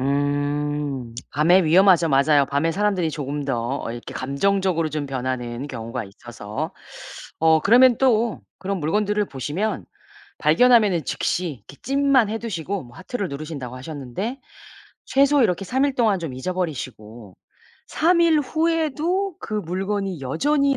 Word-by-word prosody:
음. 145 -2 -1 0.2
밤에 175 +6 +4
위험하죠. 175 +1 +5
맞아요. 140 0 +4
밤에 145 +4 0
사람들이 195 -4 0
조금 145 -1 -4
더 125 -1 -2
이렇게 120 0 -8
감정적으로 165 +4 0
좀 150 -1 -3
변하는 130 -1 -4
경우가 115 -4 -5
있어서. 105 +1 -7 0.7
어 160 -1 +5
그러면 240 +5 +5
또 235 -4 +2 0.2
그런 195 0 -3
물건들을 210 +6 0
보시면 150 - -3 0.5
발견하면은 200 - +4
즉시 180 +7 -1 0.2
이렇게 140 - -12
찜만 275 -4 +3
해 225 - -2
두시고 195 - -4
뭐 120 - -16
하트를 195 +1 -4
누르신다고 140 -4 -6
하셨는데 150 - -5 0.7
최소 280 +1 +4
이렇게 195 -3 +1
3 265 +7 +1
일 280 - -2
동안 220 -6 +2
좀 160 -7 -5
잊어버리시고 130 - -5 0.5
3 340 +2 +2
일 325 -3 +4
후에도 330 +4 0
그 215 - -6
물건이 195 -1 -2
여전히 280 - +1
170 Hz, 305 characters per minute, -22 LUFS, 140-220 Hz, 0.7 s, 위험하죠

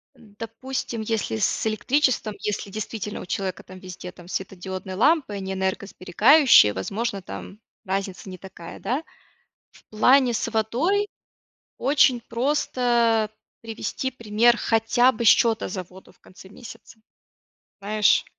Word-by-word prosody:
допустим, 225 +2 -6
если 215 - -2
с 220 - 0
электричеством, 235 +1 +1
если 205 -1 -4
действительно 215 0 -5
у - - -8
человека 185 0 -4
там 185 0 -12
везде 180 -1 -9
там 175 -2 -15
светодиодные 190 0 -5
лампы, 275 - +2
они 190 -1 -4
энергосберегающие, 190 - +4
возможно, 200 - -3
там 100 - -9 0.3
разница 190 0 -4
не 185 - -8
такая, 175 -3 -11
да. 265 +6 -2 0.7
В - - -21
плане 250 +3 +4
с - - -1
водой 280 - 0 0.7
очень 270 -2 +3
просто 235 -3 +1 0.3
привести 230 +3 -4
пример, 230 0 +2
хотя 240 +3 +2
бы 235 +2 -4
счета 225 +2 +4
за 185 0 -4
воду 185 +2 -17
в - - -31
конце 190 +1 -16
месяца, 225 +1 -13 0.8
знаешь. 210 +1 +2
220 Hz, 125 wpm, -24 LUFS, 190-240 Hz, 0.8 s, энергосберегающие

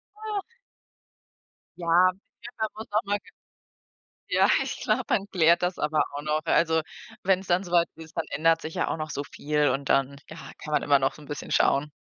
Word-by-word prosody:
Ach. 425 -2 -4 1.4
Ja. 175 +1 +4 0.3
Ja, 240 - -8
man 220 - +1
muss 220 - -8
auch 215 +1 +1
mal 205 0 0
k 195 - -42 1.0
ja, - - +3
ich - - -5
glaube, - - +1
man 200 0 +1
klärt 170 -1 +4
das 180 +1 -1
aber 150 +1 +2
auch 145 +1 -5
noch. 155 +1 0
Also, 160 0 +3 0.4
wenn's 190 0 +1
dann 180 +2 +2
soweit 175 -2 +2
ist, 160 0 -13
dann - - 0
ändert 165 +2 +2
sich 160 - -7
ja - - 0
auch - - -1
noch 155 -1 -5
so 145 - -3
viel 150 0 0
und 135 +2 -2
dann, 135 +1 +2
ja, 155 - -10 0.2
kann 150 - -8
man - - +2
immer 140 -1 +4
noch 135 0 0
so 150 - -14
'n - - -14
bisschen 145 - -6
schauen. 145 +2 +2
160 Hz, 205 wpm, -26 LUFS, 150-185 Hz, 1.4 s, Ja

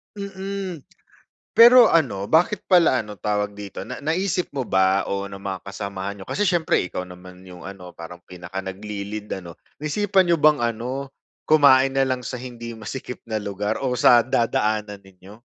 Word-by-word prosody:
Mm. 195 -4 -6 0.7
Pero 240 0 +9
ano, 105 -12 +1
bakit 175 +6 +2
pala 175 -8 +4
ano, 105 -1 -8
tawag 105 0 -2
dito, 100 -1 -8
na - - -7
naisip 180 +3 -1
mo 135 - -3
ba 95 +1 +2
o 100 0 -2
ng 100 0 -9
mga 95 -1 -4
kasamahan 100 0 -5
niyo, - - -8
kasi 205 - 0
siyempre 175 - +1
ikaw 90 - -5
naman 90 0 -13
yung 90 -1 -12
ano, 95 -2 -10
parang 85 +1 -10
pinaka 90 +2 -7
nagli-lead 100 +2 -6
ano, 85 -2 -11 0.2
naisipan 190 +4 +1
niyo 170 - +4
bang 150 -3 +4
ano, 125 +4 -3 0.4
kumain 135 -3 +5
na 135 - +4
lang 130 -1 -1
sa 125 +1 -6
hindi 120 -2 -8
masikip 125 +3 -7
na 110 -1 -3
lugar 100 +1 -3
o 135 - -1
sa 120 0 +6
dadaanan 110 -4 -1
ninyo? 95 +2 -16
110 Hz, 165 wpm, -23 LUFS, 100-155 Hz, 0.7 s, Pero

